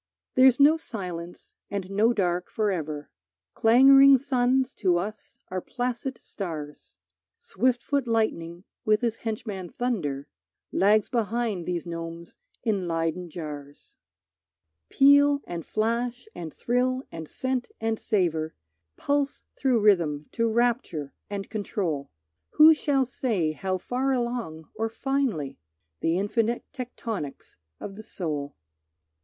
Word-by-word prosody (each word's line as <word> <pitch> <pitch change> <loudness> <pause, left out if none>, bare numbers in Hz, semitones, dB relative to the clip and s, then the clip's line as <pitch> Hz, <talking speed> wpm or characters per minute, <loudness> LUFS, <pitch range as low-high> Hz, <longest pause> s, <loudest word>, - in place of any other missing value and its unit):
There's 255 0 +6
no 300 +3 +7
silence 180 - -7 0.2
and 195 -2 -4
no 215 +4 +4
dark 180 -5 0
forever, 160 -9 -2 0.4
Clangoring 270 +4 +7
suns 260 0 +1
to 180 -4 +2
us 205 +4 -6
are 185 0 -3
placid 250 +2 -3
stars; 155 -7 -7 0.4
Swift 255 - 0
foot 280 -3 0
lightning 180 -7 -1 0.2
with 215 +1 +3
his 230 -2 0
henchman 210 -5 -4
thunder 160 - -2 0.4
Lags 210 +2 +4
behind 225 -5 -1
these 175 -1 -2
gnomes 165 0 -7 0.3
in 200 -6 0
Leyden 165 +1 -1
jars. 145 -3 -9 0.9
Peal 285 +1 +5
and 170 -1 -5
flash 235 - -1
and 165 -2 -6
thrill 255 - 0
and 165 -1 -7
scent 260 -1 -2
and 225 0 -1
savour 165 -6 0 0.4
Pulse 285 0 -1
through 255 -4 +2
rhythm 165 -8 +3
to 230 0 +1
rapture, 225 - 0 0.2
and 200 -1 -4
control, 190 -9 -3 0.4
Who 315 +1 +9
shall 280 -3 +1
say 220 -10 -1
how 185 +4 -2
far 255 +8 -1
along 235 - -3
or 225 +1 -2
finely? 235 - -1 0.4
The 165 +2 +1
infinite 225 +4 0
tectonics 230 - -6 0.2
of 195 - -7
the - - -7
soul. 150 -9 -4
215 Hz, 120 wpm, -26 LUFS, 170-245 Hz, 0.9 s, Who